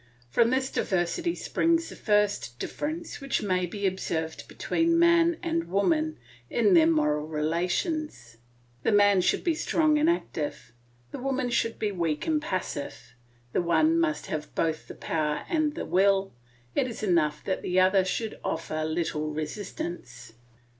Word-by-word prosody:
From 230 - +4
this 260 +1 0
diversity 185 - 0
springs 330 0 +1
the - - -9
first 205 - +1
difference 315 - -5
which 275 -4 -1
may 185 -3 0
be 200 +3 -4
observed 160 -4 -2
between 335 0 +1
man 340 0 +4
and 335 -1 -1
woman 310 - +1 0.3
in 400 - +3
their 325 -2 +6
moral 150 - +1
relations. 165 - -2 0.4
The - - +1
man 205 -2 +5
should 180 - +1
be 340 - +2
strong 310 -1 +2
and 310 +2 +3
active; 155 - -3 0.4
the - - -6
woman 260 -1 -1
should 230 -1 0
be 210 -1 -1
weak 165 -5 -1
and 310 -2 +1
passive; 185 - -4 0.4
the - - +2
one 310 - +3
must 325 -2 0
have 155 -1 -5
both 160 -1 -1
the - - -9
power 150 -2 -2
and 310 -3 0
the - - -4
will; 195 +3 +2 0.4
it 255 - +1
is 235 -2 -7
enough 155 -6 +1
that 190 - -2
the 180 +1 +1
other 190 +1 +4
should 215 +4 -3
offer 155 -1 -2
little 155 -1 -1
resistance. 150 - -6
200 Hz, 155 wpm, -27 LUFS, -, 0.4 s, their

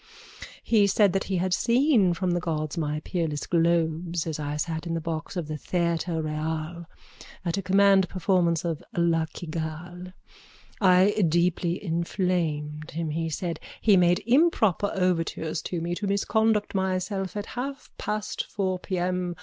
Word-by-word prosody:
He 210 -3 +4
said 200 -1 +3
that 195 - 0
he 190 - -1
had 180 +1 0
seen 235 - +3
from 185 +1 -1
the 175 - +1
gods 155 -3 -2
my 150 -2 -2
peerless 160 -4 -2
globes 170 0 +1
as 160 -2 -4
I 145 0 -3
sat 160 +2 -3
in 165 0 -1
a - - -1
box 160 +2 -4
of 170 -4 -3
the 155 0 -4
Theatre 170 0 -1
Royal 155 +2 -3 0.6
at 170 -1 0
a - - 0
command 195 0 +4
performance 175 -3 +1
of 165 -3 -2 0.2
La 165 -1 +2
Cigale. 175 +2 -6 0.7
I 185 +1 +6 0.2
deeply 175 +1 +1
inflamed 165 -3 -1
him, 160 -1 -3
he 165 +1 -2
said. 170 +2 -3 0.2
He 210 -3 +5
made 180 +2 +3
improper 230 - +3
overtures 165 -4 0
to 175 - -2
me 170 +1 -2
to 200 +3 -3
misconduct 210 +1 +1
myself 190 +1 -1
at 205 - -3
half 275 +3 -5
past 210 0 -2
four 185 -2 -2
p.m. 180 -1 -2
175 Hz, 150 wpm, -26 LUFS, 165-190 Hz, 0.7 s, I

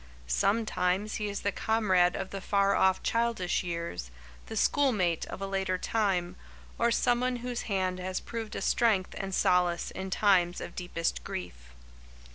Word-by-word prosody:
Sometimes 195 - 0
he 210 -1 -2
is 200 - -4
the 200 - 0
comrade 190 -5 +2
of 190 - -4
the 195 - -5
far 200 0 +2
off 190 0 +3
childish 230 -6 0
years, 170 - -4 0.4
the - - -5
schoolmate 205 - +2
of 195 - -6
a - - 0
later 190 -1 -1
time, 185 -4 0 0.4
or 235 - +3
someone 245 +2 +2
whose 245 0 -4
hand 185 -2 0
has 185 0 -3
proved 225 -2 -6
a - - -3
strength 215 -6 +2
and 195 0 -4
solace 180 -1 +2
in 190 0 -5
times 185 -3 +3
of - - -7
deepest 175 -2 -2
grief. 60 -8 -7
190 Hz, 155 wpm, -29 LUFS, 180-215 Hz, 0.4 s, off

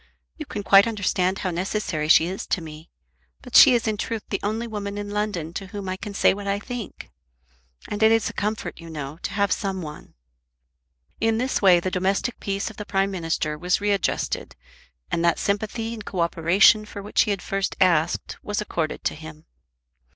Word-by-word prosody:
You 305 -2 -8
can 205 - -5
quite 200 +2 +6
understand 190 -3 0
how 185 - 0
necessary 175 -3 -2
she 160 - +6
is 185 +3 -5
to - - 0
me. 160 0 -10 0.5
But - - -8
she 250 - +9
is 230 -1 0
in 215 -1 0
truth 225 +1 -3
the 195 - -1
only 220 +3 -2
woman 205 -3 -5
in 205 0 -5
London 205 -6 -2
to 195 +1 -5
whom 200 0 -7
I 185 - -2
can 200 +1 -8
say - - +4
what 200 +1 -7
I 200 0 +1
think. 235 +1 -7 0.8
And 205 - -4
it 220 0 +6
is 225 -1 +3
a - - -5
comfort, 210 -2 -3
you 165 -1 -10
know, 150 0 -6
to - - -4
have 200 -1 +1
some 190 -2 -1
one." 150 - -10 1.0
In 225 0 +2
this 255 +3 -1
way 185 -3 +6
the 185 +2 -3
domestic 195 +6 -1
peace 200 +1 -3
of 220 - -17
the 210 - -5
Prime 195 0 +1
Minister 165 -4 -2
was 180 +2 +1
readjusted, 205 -2 -1 0.6
and 165 - 0
that 170 0 +3
sympathy 215 +3 -2
and 220 -2 -7
co 185 -3 -3
operation 170 +6 +4
for 205 -1 -9
which 205 - +2
he - - +1
had 200 -3 -1
first 195 0 -2
asked 170 -4 +1
was 205 0 -3
accorded 170 -7 -3
to - - 0
him. 155 0 -11
195 Hz, 200 wpm, -24 LUFS, 175-210 Hz, 1.0 s, she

